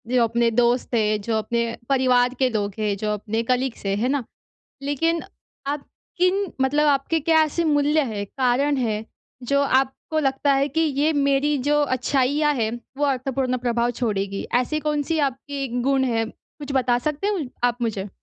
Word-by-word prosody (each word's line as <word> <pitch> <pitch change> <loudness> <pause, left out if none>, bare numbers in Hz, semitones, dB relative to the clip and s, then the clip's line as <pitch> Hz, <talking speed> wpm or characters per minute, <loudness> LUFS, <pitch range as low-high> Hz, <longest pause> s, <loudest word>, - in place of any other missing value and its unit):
जो 240 - +5
अपने 230 +1 +2
दोस्त 240 +1 +1
हैं, 215 -1 +1
जो 220 +1 -1
अपने 235 +2 -1 0.2
परिवार 250 -2 +3
के 260 - +3
लोग 205 -4 -2
हैं, 210 -2 0
जो 210 +1 -1
अपने 220 +2 -2
कलीग्स 250 -4 -1
हैं। 195 0 +1
है 235 +4 0
ना? 280 -3 0 0.6
लेकिन 325 +4 0 0.4
आप 285 0 -2 0.3
किन 380 +2 +2
मतलब 290 +3 +2
आपके 285 +3 +1
क्या 320 +1 +4
ऐसे 325 +3 -2
मूल्य 295 0 +3
हैं, 200 -1 -3
कारण 270 +4 +1
हैं, 220 -4 -1 0.4
जो 280 +3 +1
आपको 270 +3 0
लगता 275 -1 +1
है 280 - +1
कि 310 +4 -1
ये 300 0 +2
मेरी 285 0 +2
जो 295 0 +3
अच्छाइयाँ 280 +3 +1
हैं, 225 -3 -1 0.2
वो 290 - 0
अर्थपूर्ण 260 -1 0
प्रभाव 235 0 +1
छोड़ेगी? 200 -4 -1
ऐसी 305 +5 -2
कौन-सी 300 +2 0
आपकी 275 +1 -6 0.2
गुण 270 -1 +2
है? 225 0 +1
कुछ 285 +4 -10
बता 250 -2 +2
सकते 300 +6 -3
हो 405 -4 0 0.2
आप 245 0 +1
मुझे? 210 -3 -2
265 Hz, 170 wpm, -23 LUFS, 235-290 Hz, 0.6 s, जो